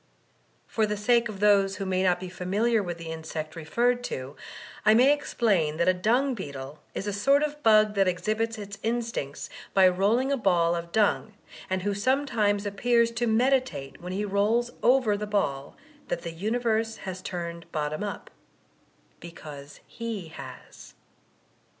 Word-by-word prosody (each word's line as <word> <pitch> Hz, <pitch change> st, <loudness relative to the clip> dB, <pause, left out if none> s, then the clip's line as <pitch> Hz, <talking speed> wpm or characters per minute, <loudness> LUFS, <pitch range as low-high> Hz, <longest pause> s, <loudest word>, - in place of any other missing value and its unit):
For 220 Hz, -1 st, 0 dB
the 210 Hz, 0 st, -2 dB
sake 235 Hz, +2 st, +2 dB
of 200 Hz, -2 st, -7 dB
those 200 Hz, -2 st, +4 dB
who 195 Hz, 0 st, -4 dB
may 185 Hz, -1 st, 0 dB
not 180 Hz, -2 st, +2 dB
be 185 Hz, -, -6 dB
familiar 205 Hz, +6 st, 0 dB
with 175 Hz, -3 st, -4 dB
the 165 Hz, -1 st, -7 dB
insect 160 Hz, -1 st, -6 dB
referred 240 Hz, +10 st, 0 dB
to, 130 Hz, -, -5 dB, 0.5 s
I 215 Hz, 0 st, +6 dB
may 260 Hz, +5 st, +6 dB
explain 200 Hz, -, 0 dB
that 170 Hz, -, +1 dB
a 185 Hz, -, +6 dB
dung 240 Hz, +9 st, +1 dB
beetle 140 Hz, -, -7 dB, 0.2 s
is -, -, -3 dB
a 205 Hz, -, -2 dB
sort 275 Hz, +8 st, +3 dB
of 295 Hz, 0 st, -3 dB
bug 215 Hz, -2 st, +5 dB
that 195 Hz, -2 st, +2 dB
exhibits 215 Hz, +5 st, -1 dB
its 200 Hz, -1 st, -8 dB
instincts 230 Hz, -11 st, -3 dB, 0.3 s
by 190 Hz, -1 st, +7 dB
rolling 210 Hz, +9 st, +2 dB
a 280 Hz, -, +2 dB
ball 175 Hz, -6 st, +2 dB
of 170 Hz, 0 st, -5 dB
dung, 215 Hz, 0 st, +1 dB, 0.3 s
and 185 Hz, 0 st, -1 dB
who 205 Hz, 0 st, 0 dB
sometimes 215 Hz, -3 st, +1 dB
appears 235 Hz, +3 st, +2 dB
to 235 Hz, +1 st, -1 dB
meditate 225 Hz, -, +1 dB
when 180 Hz, +1 st, -6 dB
he 200 Hz, +3 st, -2 dB
rolls 215 Hz, +5 st, +1 dB
over 245 Hz, -3 st, +4 dB
the 210 Hz, +1 st, -4 dB
ball 145 Hz, -10 st, -2 dB, 0.3 s
that -, -, -3 dB
the 170 Hz, -, -4 dB
universe 225 Hz, +4 st, 0 dB
has 185 Hz, -1 st, -5 dB
turned 170 Hz, -3 st, -6 dB
bottom 155 Hz, +3 st, -2 dB
up 205 Hz, -, -6 dB, 0.4 s
— -, -, -37 dB
^because 150 Hz, -4 st, -10 dB
he 225 Hz, -8 st, -6 dB
has. -, -, -11 dB
205 Hz, 165 wpm, -27 LUFS, 175-230 Hz, 0.5 s, by